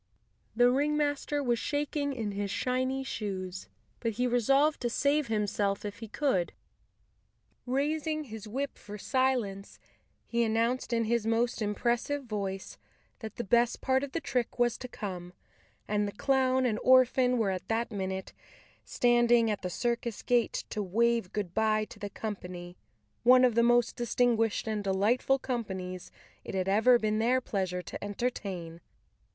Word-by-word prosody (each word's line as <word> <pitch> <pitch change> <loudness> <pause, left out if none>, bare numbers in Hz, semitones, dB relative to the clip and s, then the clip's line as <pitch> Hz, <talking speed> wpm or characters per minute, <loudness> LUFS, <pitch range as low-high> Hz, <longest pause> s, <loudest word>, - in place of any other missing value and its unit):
The 245 +1 +5
ringmaster 290 +1 0
was 240 -3 +1
shak¬ 290 +2 -2
ing 285 -1 0
in 225 -6 -3
his 200 0 -3
shiny 255 +4 -1
shoes, 190 -7 -5 0.3
but 230 -2 -1
he 245 +4 0
resolved 270 +5 +3
to 240 - 0
save 285 +3 +1
himself 205 -2 -1
if 205 +1 -6
he 225 - -7
could. 210 - 0 1.1
Raising 305 +4 0
his 220 -5 -9
whip 270 +6 -4
for 210 0 -9
silence, 240 -5 -1 0.5
he 235 0 0
announced 230 +3 0
in 230 -1 +2
his 225 0 0
most 230 +1 +1
impressive 240 +7 0
voice 200 -5 -5 0.4
that 220 -3 -7
the 240 - -3
best 235 +3 +2
part 265 0 +1
of 280 - -6
the 335 - 0
trick 250 -6 -2
was 240 -1 +2
to 255 - -6
come—that 195 +1 -6
the - - -4
clown 260 +1 +2
and 220 -3 0
orphan 255 0 +5
were 215 -4 +1
at 185 -1 -5
that 230 +1 -1
minute 190 -2 -4 0.5
standing 240 -2 +3
at 210 - -3
the 180 - -3
circus 235 +2 -2
gate 240 -2 +1
to 210 - -2
wave 230 +1 +1
good¬ 200 -5 -3
bye 215 0 +2
to - - -14
the 205 - -5
company, 180 -5 -6 0.5
one 255 +1 +7
of 245 - +3
the 235 - +4
most 240 0 +3
distinguished 235 -2 +1
and 215 -2 -2
delightful 210 +8 +2
companies 190 -9 -4 0.3
it - - -6
had 185 0 -1
ever 220 +5 +5
been 215 -1 0
their 245 +3 +3
pleasure 185 -6 -2
to - - -7
entertain. 195 -6 -4
230 Hz, 155 wpm, -30 LUFS, 205-255 Hz, 1.1 s, one